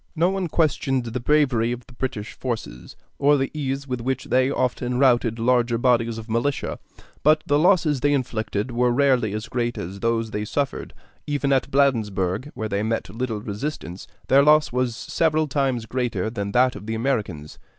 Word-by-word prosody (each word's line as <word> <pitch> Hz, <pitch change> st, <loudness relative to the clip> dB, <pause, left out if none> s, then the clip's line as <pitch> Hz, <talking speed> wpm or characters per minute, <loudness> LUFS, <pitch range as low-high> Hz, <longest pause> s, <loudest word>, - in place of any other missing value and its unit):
No 170 Hz, +3 st, +2 dB
one 190 Hz, -2 st, -2 dB
questioned 140 Hz, -5 st, +1 dB
the 120 Hz, +1 st, -4 dB
bravery 125 Hz, -4 st, +2 dB
of 120 Hz, 0 st, -5 dB
the 125 Hz, -, -17 dB
British 120 Hz, -4 st, -4 dB
forces, 110 Hz, -, -6 dB, 0.2 s
or 145 Hz, +1 st, +4 dB
the 135 Hz, 0 st, -1 dB
ease 140 Hz, -2 st, -3 dB
with 125 Hz, -2 st, -3 dB
which 130 Hz, +1 st, -2 dB
they 130 Hz, +1 st, +2 dB
often 125 Hz, -2 st, -1 dB
routed 120 Hz, -4 st, +3 dB
larger 120 Hz, 0 st, +2 dB
bodies 115 Hz, -2 st, +2 dB
of 115 Hz, 0 st, -8 dB
militia; 120 Hz, +5 st, -1 dB, 0.4 s
but 155 Hz, +1 st, +4 dB
the 145 Hz, 0 st, +2 dB
losses 165 Hz, -5 st, +3 dB
they 145 Hz, +3 st, +2 dB
inflicted 115 Hz, -4 st, -2 dB
were 120 Hz, +1 st, +2 dB
rarely 130 Hz, -4 st, +2 dB
as 110 Hz, +1 st, -4 dB
great 120 Hz, -1 st, -2 dB
as 95 Hz, +4 st, -6 dB
those 115 Hz, 0 st, 0 dB
they 105 Hz, -1 st, -2 dB
suffered. 140 Hz, +6 st, -3 dB, 0.3 s
Even 145 Hz, -1 st, +1 dB
at 135 Hz, -, +1 dB
Bladensburg, 110 Hz, -5 st, +1 dB
where 110 Hz, -, -3 dB
they 100 Hz, -1 st, -1 dB
met 110 Hz, -2 st, -2 dB
little 115 Hz, -3 st, -3 dB
resistance, 100 Hz, -, -5 dB, 0.2 s
their 135 Hz, +1 st, +6 dB
loss 150 Hz, +1 st, +4 dB
was 125 Hz, -1 st, 0 dB
several 155 Hz, +4 st, 0 dB
times 135 Hz, -5 st, 0 dB
greater 120 Hz, -1 st, -2 dB
than 100 Hz, -3 st, -4 dB
that 125 Hz, +2 st, +3 dB
of 105 Hz, -, -9 dB
the 110 Hz, -, -2 dB
Americans. 105 Hz, -, -3 dB
125 Hz, 180 wpm, -23 LUFS, 115-140 Hz, 0.4 s, their